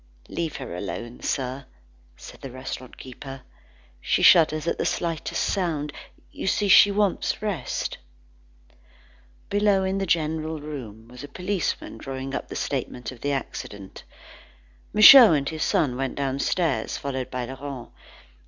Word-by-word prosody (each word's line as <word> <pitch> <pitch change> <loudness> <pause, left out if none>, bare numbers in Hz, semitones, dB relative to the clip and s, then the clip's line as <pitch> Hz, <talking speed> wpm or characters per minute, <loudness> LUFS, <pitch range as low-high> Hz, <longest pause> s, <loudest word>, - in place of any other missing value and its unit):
"Leave 165 -3 -3
her 130 -10 -6
alone, 115 +6 -6
sir," 130 0 -3 0.5
said - - -12
the 135 - -7
restaurant 130 0 -8
keeper, 135 +1 -10 0.6
"she - - 0
shudders 155 -2 +6
at 170 - -1
the - - +1
slightest 165 -3 -2
sound. 155 -7 -1 0.4
You - - -6
see, 205 +1 +1
she 205 - +8
wants 200 -1 0
rest." 190 - -3 1.5
Below, 205 -1 +3
in 190 +1 -1
the 195 - -2
general 160 -1 -1
room, 120 -8 -8
was 125 +3 -11
a - - -7
policeman 180 +4 -3
drawing 135 0 -6
up - - -5
a - - -5
statement 125 -2 -3
of 125 - -13
the 145 - -1
accident. 105 -7 -6 0.9
Michaud 215 -1 +10
and 140 -2 0
his 160 -1 -4
son 130 -5 +1
went 135 +1 -3
downstairs, 140 +3 -1
followed 130 -2 -4
by 125 -1 -3
Laurent. 135 0 -7
145 Hz, 140 wpm, -25 LUFS, 130-170 Hz, 1.5 s, Michaud